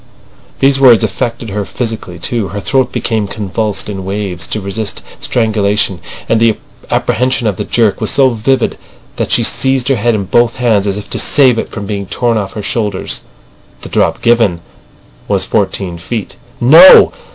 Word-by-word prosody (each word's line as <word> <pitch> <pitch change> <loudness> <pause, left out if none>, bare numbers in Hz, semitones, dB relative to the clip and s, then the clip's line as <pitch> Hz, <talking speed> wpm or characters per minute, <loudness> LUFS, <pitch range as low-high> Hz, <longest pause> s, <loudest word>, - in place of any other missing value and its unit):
These 135 0 +3
words 125 -6 +6
affected 120 -3 -3
her 105 +1 -2
physically 110 -5 -5
too. 110 +4 -2
Her 100 - -6
throat 130 +4 0
became 110 -3 -2
convulsed 105 0 -3
in 100 -2 -5
waves 95 -3 -4
to 110 - -3
resist 100 +1 -5 0.2
strangulation; 105 -4 0 0.3
and 115 - +2
the 115 -1 +2 0.3
apprehension 125 +1 0
of 105 -4 -1
the - - -3
jerk 110 -4 +1
was - - 0
so 135 -2 +3
vivid 120 +3 -1 0.4
that - - -2
she - - +2
seized 130 -1 +1
her 135 - +2
head 115 +2 +1
in 100 -2 -3
both 120 +4 +2
hands 110 -5 +1
as 100 0 -1
if 105 - -8
to - - -1
save 130 -5 +3
it - - -4
from 100 -2 -7
being 100 -1 -4
torn 120 +2 0
off 100 -3 -3
her 105 - -6
shoulders. 105 -2 -3 0.6
"The - - -9
drop - - 0
given 115 -8 +2 0.7
was - - 0
fourteen 90 -3 -2
feet." 110 +4 -5 0.2
No! 160 +10 +8
110 Hz, 175 wpm, -13 LUFS, 100-120 Hz, 0.7 s, No